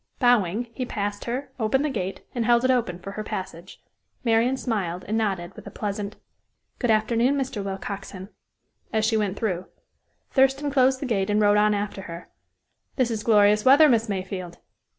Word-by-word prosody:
Bowing, 240 -2 +2
he 255 - -3
passed 205 -4 -4
her, 255 +3 -4
opened 255 +6 +1
the - - 0
gate, 195 -5 -4
and 240 - -1
held 240 +2 +3
it 260 - +4
open 230 -9 0
for 190 +2 -8
her 215 +1 -5
passage. 185 -3 -7 0.4
Marian 235 +2 +2
smiled, 185 -8 -3
and 215 - -1
nodded 195 -6 -1
with - - -11
a - - -5
pleasant: 205 0 -4 0.6
"Good 245 - 0
afternoon, 230 +4 +2
Mr. 260 -7 -3
Willcoxen," 195 0 -6 0.6
as 220 -1 +1
she 220 0 +1
went 205 -2 0
through, 185 -5 -2 0.6
Thurston 270 +2 +2
closed 260 -1 +3
the - - -2
gate 205 -5 0
and 210 0 +2
rode 205 -1 +4
on 210 0 +3
after 200 -1 -3
her. 170 -1 -9 0.7
"This 250 -3 +1
is 220 -2 -2
glorious 210 -1 +4
weather, 285 +4 +7
Miss 230 -4 +2
Mayfield." 185 -3 -4
215 Hz, 175 wpm, -25 LUFS, 195-245 Hz, 0.7 s, weather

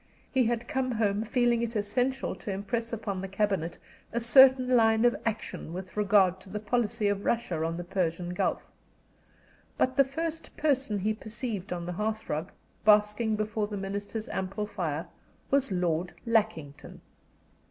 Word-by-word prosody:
He 260 -2 +3
had 235 +1 -1
come 265 -4 -1
home 210 -2 +1
feeling 240 0 +2
it 235 0 -3
essential 245 +6 0
to 210 - -5
impress 225 +4 -3
upon 205 -4 -3
the 195 - -4
cabinet 195 -4 -1 0.3
a 235 - 0
certain 255 +2 +7
line 225 0 +4
of 240 - +4
action 215 -6 -4
with 185 +1 -7
regard 195 -3 +4
to 190 - -14
the 210 +2 -4
policy 220 0 0
of 200 0 0
Russia 205 -9 0
on 165 +1 -2
the 175 - -4
Persian 175 -1 -2
Gulf. - - -1 1.1
But 255 0 +1
the 275 - +8
first 320 +4 -5
person 270 -8 +1
he 210 +3 0
perceived 220 -2 -5
on 175 -1 -3
the 175 - -3
hearth 215 +3 -3
rug, 155 +2 -2 0.3
basking 210 +1 +4
before 215 0 -1
the 205 -1 -5
Minister's 200 +3 -4
ample 195 +3 -3
fire, 170 -7 -3 0.5
was 275 -4 +2
Lord 175 -1 -1
Lackington. 210 -11 -1
210 Hz, 160 wpm, -29 LUFS, 190-235 Hz, 1.1 s, the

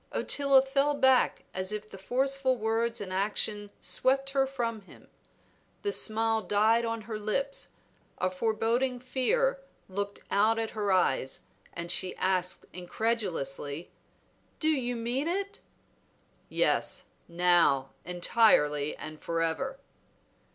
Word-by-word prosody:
Ottila 275 -2 +3
fell 280 +2 +1
back 265 -2 +3
as 185 +1 -1
if 210 0 -4
the 195 - -11
forceful 260 +4 +1
words 230 +1 0
and 185 -2 -5
action 205 +1 -1
swept 270 +1 +1
her 270 -1 +2
from 235 -5 -3
him. 195 - -17 0.7
The 405 - 0
smile 225 - +1
died 220 +3 +3
on 230 -1 -3
her 215 0 -6
lips, 275 +7 -2 0.5
a 185 - 0
foreboding 230 +5 0
fear 480 - +1 0.3
looked 200 +1 -4
out 215 +3 +3
at 225 -1 -2
her 205 -2 -1
eyes, 135 -8 +1 0.3
and 170 0 -4
she 185 0 +1
asked 185 -1 0
incredulously 175 -7 -2 0.7
"Do 315 - +2
you 250 -5 0
mean 240 +6 -2
it?" 395 +3 -3 0.9
"Yes; - - +1 0.2
now, 170 -6 +3
entirely, 170 -5 +3
and 155 0 -8
forever!" 165 +12 -1
220 Hz, 120 wpm, -29 LUFS, 185-260 Hz, 0.9 s, Ottila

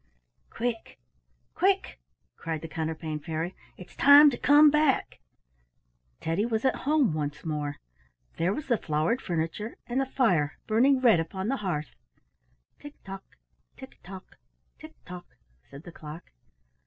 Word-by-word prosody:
"Quick! 230 -1 -4 0.6
quick!" 385 +2 0 0.4
cried 160 -2 -5
the - - -5
Counterpane 160 -1 -4
Fairy. 165 +3 -4 0.2
"It's 180 - -13
time 285 +1 +8
to - - -3
come 295 +1 +6
back." 300 -2 +1 1.0
Teddy 165 +5 -1
was 225 +1 -1
at 265 - +2
home 290 - +3
once 150 0 -4
more. 150 -2 -3 0.6
There 170 +3 +1
was 300 +8 -4
the 235 -5 +1
flowered 155 - -1
furniture, 170 +6 -3
and 250 +2 -1
the 270 - -2
fire 180 - +1
burning 255 +5 +3
red 230 -9 +5
upon 190 +5 -4
the 270 - 0
hearth. 165 - -4 0.9
"Tick 290 0 -11
tock! 195 0 -11 0.4
tick - - -13
tock! 190 0 -12 0.4
tick 310 0 -12
tock!" 180 -1 -11 0.3
said 140 +2 -12
the 175 - -11
clock. 155 0 -11
190 Hz, 140 wpm, -27 LUFS, 160-260 Hz, 1.0 s, time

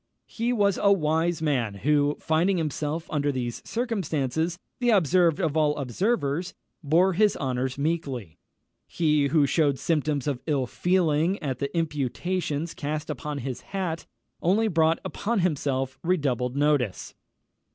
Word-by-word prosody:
He 235 +2 -2
was 200 -5 +2
a 200 - +5
wise 160 -2 +1
man 125 -9 0
who, 145 +5 +2
finding 175 +5 +1
himself 155 0 -2
under 145 -1 +1
these 120 -3 -4
circumstances 170 - -1 0.2
"the 245 -1 +2
observed 180 - +3
of 160 -5 0
all 150 -1 +2
observers," 160 - -1 0.3
bore 170 +5 +3
his 210 +2 +3
honours 130 0 -2
meekly. 140 - -3 0.5
He 150 -4 +2
who 150 0 +3
shewed 145 -1 +2
symptoms 150 -4 0
of 140 -4 -2
ill 140 -4 +1
feeling 175 +3 +1
at 130 -4 -2
the 140 - -2
imputations 160 +2 -2
cast 150 +1 -3
upon 150 +1 -5
his 130 -3 -4
hat, 180 -4 -4 0.3
only 205 +6 +3
brought 165 -4 +3
upon 225 -1 -1
himself 135 -6 -1
redoubled 135 -8 0
notice. 140 -7 0
155 Hz, 135 wpm, -26 LUFS, 140-175 Hz, 0.5 s, a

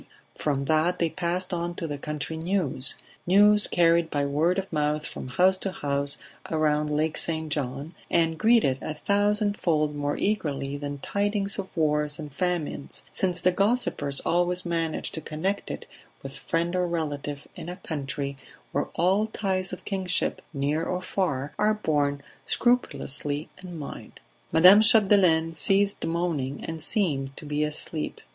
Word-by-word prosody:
From 140 -2 -1
that 160 +4 +2
they 165 -2 0
passed 180 +1 -2
on 175 0 -2
to 170 - -4
the 145 -3 -4
country 150 +1 -4
news 160 -6 0 0.3
news 205 +3 +6
carried 170 -1 +3
by 145 -2 0
word 155 +6 +1
of 195 -2 -4
mouth 150 0 0
from - - -6
house 185 +8 +3
to 195 - -2
house 140 -3 0 0.3
around 150 -1 +1
Lake 150 +1 0
St. 160 -2 -1
John, 140 +3 -3 0.2
and 165 -1 +2
greeted 220 - +4
a 155 - -4
thousandfold 200 -6 +1
more 145 0 -1
eagerly 145 -9 -1
than 145 0 -5
tidings 200 +5 0
of 190 - -4
wars 150 -1 +1
and 150 -3 -8
famines, 170 -3 -2
since 180 -2 0
the 185 - +4
gossipers 190 - 0
always 175 +1 +1
manage 165 -2 -1
to 160 - -5
connect 180 +7 -2
it - - -6 0.4
with - - -6
friend 170 +1 -1
or 180 -1 +1
relative 145 -4 -3
in 170 - -7
a 180 - -5
country 140 -4 -4 0.4
where 145 - 0
all 190 +6 +2
ties 190 -4 -1
of 185 - -8
kinship, 190 -3 -1
near 145 +2 -1
or 180 +2 -2
far, 150 -8 -1
are 215 +1 +3
borne 145 -7 0 0.2
scrupulously 150 - 0
in 175 -2 -7
mind. 145 - -8 0.3
Madame 185 +6 +8
Chapdelaine 190 -7 +5
ceased 195 +6 +2
moaning 165 -5 -2
and 160 -1 -5
seemed 145 - 0
to - - -7
be 150 +1 0
asleep. 150 +1 -3
165 Hz, 150 wpm, -26 LUFS, 145-185 Hz, 0.4 s, Madame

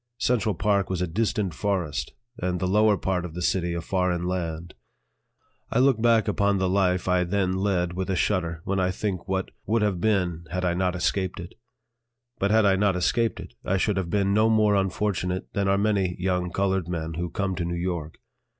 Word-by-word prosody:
Central 110 -5 +1
Park 100 +1 +1
was 95 -2 -1
a - - -1
distant 100 0 -1
forest, 75 -8 -2 0.3
and 90 0 -1
the 95 - -1
lower 105 +2 +4
part 95 -2 -1
of 85 -2 -7
the 90 - -4
city 85 -2 0
a 85 - -2
foreign 90 0 0
land. 85 -2 -3 1.0
I - - -1
look 130 -3 +4
back 115 -2 +4
upon 100 -1 +2
the 95 0 +1
life 90 -1 +1
I 90 -1 +3
then 95 +1 0
led 95 -2 0
with 95 +1 -3
a 95 - +1
shudder 85 -3 0
when 100 0 -1
I 90 0 +2
think 95 -1 -3
what 95 -1 -2 0.2
would 110 +1 +2
have 95 -4 0
been 90 -6 0
had 90 +1 -2
I 90 - +2
not 90 0 0
escaped 95 +1 -1
it. 85 - -8 0.9
But 100 - +1
had 110 0 +4
I 95 -1 +4
not 100 -1 +2
escaped 115 +5 +1
it, - - -9
I 95 +1 0
should 100 +1 0
have 90 -3 -2
been 100 +1 +1
no 110 +2 +4
more 110 -2 +4
unfortunate 95 -2 -1
than 100 -1 0
are 100 0 +3
many 100 -3 +1
young 90 -1 -1
colored 95 -1 0
men 80 -2 -3
who 85 +2 -3
come 100 -1 -2
to 85 - -1
New 85 0 -2
York. 85 -3 -3
95 Hz, 205 wpm, -25 LUFS, 90-100 Hz, 1.0 s, lower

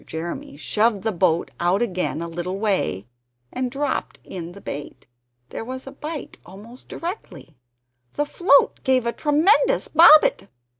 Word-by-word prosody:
Jeremy 160 -2 -6
shoved 210 +6 0
the 220 - 0
boat 170 -3 0
out 175 +3 +1
again 180 -6 -2
a - - -5
little 175 +3 -5
way, 195 - -1 0.5
and 255 0 -2
dropped 280 +3 -3
in 175 -2 -8
the 200 - -12
bait. 145 -6 -8 0.4
There - - -6
was 260 +2 -7
a 270 - -8
bite 300 +1 -8
almost 210 +7 -14
directly; 335 - -7 0.6
the 295 - -1
float 290 -1 +3
gave 260 -2 +2
a 235 - -1
tremendous 380 +12 +2
bobbit! 330 - +6
225 Hz, 145 wpm, -22 LUFS, 175-290 Hz, 0.6 s, bobbit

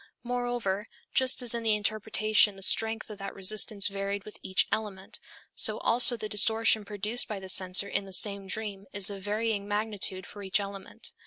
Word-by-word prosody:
Moreover, 245 -4 -2 0.3
just 260 0 +3
as 240 - +4
in 235 - -2
the 220 -2 +2
interpretation 215 0 +2
the 195 - -5
strength 225 +2 +1
of 205 - -10
the 195 0 -5
resistance 200 +1 +2
varied 200 0 -4
with 215 - -12
each 190 - +1
element, 195 -3 -3 0.3
so - - 0
also 240 +1 +5
the 215 - -5
distortion 220 +1 +3
produced 210 +3 -1
by 210 -2 -5
the 190 0 -9
censor 185 +1 +3
in 200 - -1
the 195 - -11
same 200 +1 +1
dream 200 0 -3
is 200 0 +2
of 200 -1 -7
varying 210 0 -2
magnitude 205 -3 0
for 205 - -11
each 195 +1 0
element. 200 -1 -7
205 Hz, 180 wpm, -28 LUFS, 195-220 Hz, 0.3 s, also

